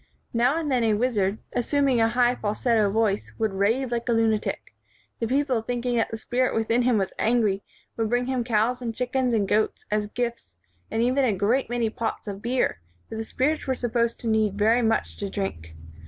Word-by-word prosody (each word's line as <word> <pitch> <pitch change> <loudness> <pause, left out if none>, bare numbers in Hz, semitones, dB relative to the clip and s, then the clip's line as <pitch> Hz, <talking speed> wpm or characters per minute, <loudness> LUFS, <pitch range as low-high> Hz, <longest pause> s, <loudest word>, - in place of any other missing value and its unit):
Now 240 +6 +2
and 310 -3 -2
then 250 -2 +2
a 220 -2 +3
wizard, 210 -4 +1 0.2
assuming 265 0 +2
a 225 - +5
high 240 +1 +3
fal 210 -3 -3
setto 220 -5 +2
voice, 215 -1 0
would 220 -3 0
rave 225 +7 +1
like 235 +1 -2
a - - +4
lunatic. 225 -2 0 0.5
The 230 - -1
people 265 -2 +1
thinking 245 +1 -2
that 225 - +1
the 225 - -5
spirit 250 +3 0
within 225 +2 +2
him 245 -2 +3
was 195 -2 -1
angry, 215 -4 +2 0.4
would 225 -1 0
bring 245 +1 +1
him 255 -1 -1
cows 235 +2 +1
and 230 -2 -4
chick 250 +2 -3
ens 255 -3 +2
and 205 -3 +1
goats 215 +2 0
as 210 0 0
gifts 235 - -4 0.3
and 225 - 0
even 255 +3 +2
a 240 -5 +2
great 215 +7 +1
many 235 -2 0
pots 230 -1 -4
of 200 -1 -5
beer, 240 - 0 0.3
for - - -6
the 220 - -3
spirits 280 +8 -1
were 260 - +1
supposed 235 -1 -1
to 235 - -4
need 215 -2 +1
very 225 +4 +3
much 225 -1 0
to 200 - -4
drink. 80 - -5
230 Hz, 210 wpm, -25 LUFS, 215-245 Hz, 0.5 s, a